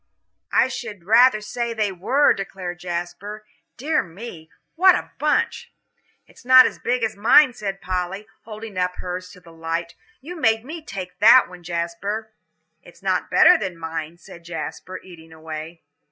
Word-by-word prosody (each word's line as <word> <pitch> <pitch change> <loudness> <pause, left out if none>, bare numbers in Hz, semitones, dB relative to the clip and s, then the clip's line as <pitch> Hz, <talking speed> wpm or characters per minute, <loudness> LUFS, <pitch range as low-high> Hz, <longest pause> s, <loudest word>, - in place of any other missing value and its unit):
"I - - +4
should 235 -8 -7
rather 225 +3 +5
say 235 +2 -4
they 210 -2 0
were," 250 +11 +3
declared 185 -3 -6
Jasper; 180 +4 -6 0.3
"dear 305 +5 +1
me, 170 -2 -10 0.2
what 370 +2 +6
a - - -5
bunch!" 475 0 0 0.5
"It's - - -20
not 255 +1 +8
as - - -3
big 245 0 -1
as 220 -1 -1
mine," 250 +6 +5
said 195 -4 -5
Polly, 185 +3 -3 0.2
holding 215 -3 -8
up 180 0 -1
hers 180 0 -6
to 180 - -15
the 170 -2 -17
light. 165 +1 -4 0.3
"You 330 +7 -9
made 225 -5 +1
me 320 +4 -7
take 185 -7 -8
that 230 +5 +7
one, 180 0 -13
Jasper." 175 +6 -4 0.5
"It's - - -18
no - - +2
better 360 - +6
than 185 -4 -4
mine," 160 0 -6
said 175 -1 -14
Jasper, 175 +2 -7
eating 165 -3 -14
away. 160 +1 -8
195 Hz, 160 wpm, -22 LUFS, 175-230 Hz, 0.5 s, not